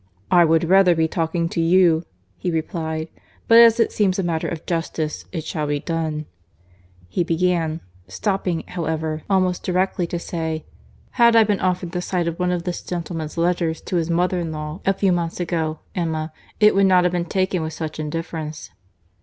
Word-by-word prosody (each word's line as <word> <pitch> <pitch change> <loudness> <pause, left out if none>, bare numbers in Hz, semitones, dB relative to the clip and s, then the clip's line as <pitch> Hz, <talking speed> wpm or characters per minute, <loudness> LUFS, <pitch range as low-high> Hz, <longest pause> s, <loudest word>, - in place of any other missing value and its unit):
"I 175 -1 +6
would 160 0 +3
rather 180 0 +5
be 160 0 +2
talking 165 +1 -1
to 165 - -1
you," 170 -1 +4 0.3
he 180 - -2
replied; 160 -1 -3 0.4
"but 230 0 +8
as 230 0 +7
it 230 - +3
seems 195 -3 +1
a 195 - 0
matter 165 -2 -1
of 165 -2 -5
justice, 165 -2 -3
it 165 -4 -4
shall 155 -1 -3
be 145 0 0
done." 160 -1 -3 0.8
He 90 - 0
began—stopping, 165 - -1
however, 160 -2 -2
almost 185 -2 +2
directly 185 -1 0
to 175 - -3
say, 160 -2 -4 0.6
"Had 235 -1 +7
I 225 - +8
been 205 -2 0
offered 180 -1 -1
the 180 - -2
sight 180 -1 -1
of 170 +1 -3
one 180 0 +1
of 175 -1 -1
this 180 -1 -3
gentleman's 165 -2 -5
letters 170 -1 0
to 180 - -2
his 165 0 -1
mother 180 +2 +1
in 165 -2 -3
law 155 +2 -5
a 195 - +5
few 195 -1 +2
months 170 -1 -1
ago, 160 -3 -2
Emma, 160 -2 -2 0.3
it 210 0 +6
would 195 0 +4
not 185 -1 +5
have 180 0 +1
been 175 -1 0
taken 185 0 0
with 160 0 -4
such 155 0 -5
indifference." 155 0 -5
170 Hz, 185 wpm, -22 LUFS, 160-180 Hz, 0.8 s, but